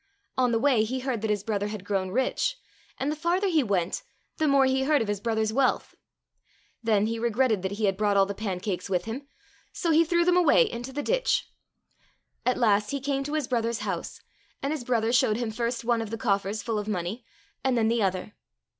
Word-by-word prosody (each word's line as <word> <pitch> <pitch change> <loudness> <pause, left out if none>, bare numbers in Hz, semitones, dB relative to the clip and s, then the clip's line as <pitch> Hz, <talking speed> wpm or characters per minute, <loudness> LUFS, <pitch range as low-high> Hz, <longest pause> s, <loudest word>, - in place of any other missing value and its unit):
On 250 -2 +2
the 230 - +2
way 245 -3 +3
he 255 +4 -3
heard 255 -4 -2
that 220 - -2
his 205 -2 0
brother 205 -2 -1
had 210 -3 -6
grown 195 -2 -1
rich, 265 - 0 0.4
and 280 +3 -1
the - - -2
farther 340 +5 0
he 320 -4 +3
went 195 - -1 0.4
the 315 - +1
more 275 -1 +5
he 265 0 +2
heard 295 0 +3
of 225 - -1
his 205 -1 -1
brother's 220 0 0
wealth. 260 +1 +1 0.9
Then 215 -3 +2
he 225 +1 -2
regretted 235 -2 +1
that 190 +1 -3
he 210 +1 -1
had 195 -1 +1
brought 205 -1 +2
all 195 - +6
the 200 - -4
pancakes 195 -2 -3
with 180 -2 0
him, 255 +6 -6 0.4
so 335 - -1
he 320 +1 +6
threw 340 +1 +2
them 360 0 +4
away 360 +7 +6
into 245 - -5
the 290 +2 -3
ditch. - - +1 1.0
At 250 - +2
last 210 -3 +3
he 280 - -2
came 275 0 -1
to 295 - -4
his 300 -5 -1
brother's 235 -1 -1
house, - - -4 0.4
and 275 +2 -2
his 300 -5 -4
brother 235 -1 +1
showed 220 -3 +3
him 235 -2 -2
first 235 +1 -2
one 235 -1 +2
of 225 - -5
the 225 - -4
coffers 205 -2 -1
full 225 -3 -1
of 210 - -5
money 205 +4 -3 0.4
and 260 -2 +2
then 220 -1 +3
the 230 0 +1
other. 190 +1 -1
230 Hz, 220 wpm, -27 LUFS, 210-270 Hz, 1.0 s, all